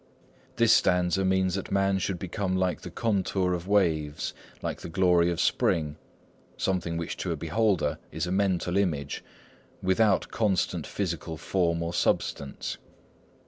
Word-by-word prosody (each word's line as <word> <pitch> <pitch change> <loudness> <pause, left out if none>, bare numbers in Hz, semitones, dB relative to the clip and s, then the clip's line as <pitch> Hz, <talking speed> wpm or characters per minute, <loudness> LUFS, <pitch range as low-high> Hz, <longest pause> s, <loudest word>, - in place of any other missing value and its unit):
This 115 -1 +5
stanza 90 +1 +3
means 95 -1 +2
that 95 0 -3
man 95 0 +2
should 95 -1 -1
become 95 +1 -2
like 95 -1 0
the - - -7
contour 95 -2 0
of 90 0 -4
waves, 80 -7 +1 0.3
like - - -3
the - - -6
glory 90 -1 +3
of 85 -1 -2
spring,—something 85 +2 -2
which 85 - -4
to - - -2
a - - 0
beholder 95 +3 +1
is - - -2
a 90 - -3
mental 95 -2 +1
image, 75 -8 -1 0.6
without 95 +1 +3
constant 105 -5 0
physical 85 -4 -3
form 85 -1 0
or 85 +1 -3
substance. 70 -4 -1
90 Hz, 140 wpm, -28 LUFS, 85-95 Hz, 0.6 s, This